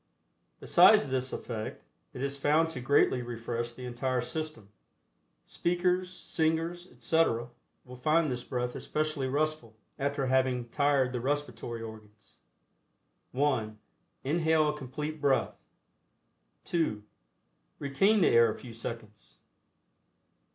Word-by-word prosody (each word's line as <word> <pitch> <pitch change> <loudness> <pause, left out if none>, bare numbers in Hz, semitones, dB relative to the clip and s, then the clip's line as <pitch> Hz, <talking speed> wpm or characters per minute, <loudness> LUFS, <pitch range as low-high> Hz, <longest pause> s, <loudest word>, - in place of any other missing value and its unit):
Besides 210 -10 +6
this 130 0 0
effect, 110 -3 -5 0.3
it 130 - -6
is 140 0 -2
found 150 +4 +2
to 145 - -6
greatly 130 -1 +3
refresh 120 0 -4
the 125 +1 -9
entire 125 +1 -1
system. 155 -6 -4 0.8
Speakers, 180 +1 0
singers, 165 0 -1
etc., 120 -8 +1 0.4
will 125 0 -10
find 155 +3 +2
this 125 -1 -4
breath 125 -1 -3
especially 155 -3 -2
restful, 145 -5 -1 0.2
after 140 0 0
having 130 -2 +1
tired 140 -1 +2
the 125 - -2
respiratory 135 -4 -3
organs. 110 -1 -12 0.9
(1) 125 -6 0 0.5
Inhale 160 +1 +2
a - - 0
complete 150 +2 -5
breath. 140 -2 +2 1.1
(2) 155 -12 -1 0.7
Retain 195 +10 +2
the - - +5
air 115 -1 +6
a - - -7
few 120 -3 -10
seconds. 110 - -8
135 Hz, 115 wpm, -30 LUFS, 120-155 Hz, 1.1 s, Besides